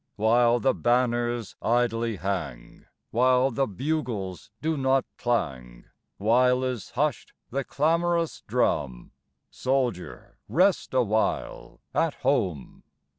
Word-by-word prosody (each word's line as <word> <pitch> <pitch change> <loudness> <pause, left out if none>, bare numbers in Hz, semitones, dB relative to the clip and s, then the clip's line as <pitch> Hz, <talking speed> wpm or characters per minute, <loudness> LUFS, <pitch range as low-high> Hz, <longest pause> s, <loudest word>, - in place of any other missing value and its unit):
While 120 +2 +3
the 130 +2 +2
banners 120 -2 0
idly 115 -1 +1
hang, 85 -10 -5 0.2
While 125 +2 +3
the 135 +3 0
bugles 110 - -3
do 160 +1 -1
not 135 -1 +2
clang, 65 - -2 0.3
While 125 +4 +3
is 125 -5 -3
hushed 145 -1 -2 0.2
the 135 +2 -1
clamorous 165 +4 0
drum, 60 -3 -1 0.4
Soldier, 125 -8 -2
rest 185 -5 +2
awhile 110 -3 -1
at 165 -3 +1
home. 95 - -1
120 Hz, 100 wpm, -26 LUFS, 105-135 Hz, 0.4 s, While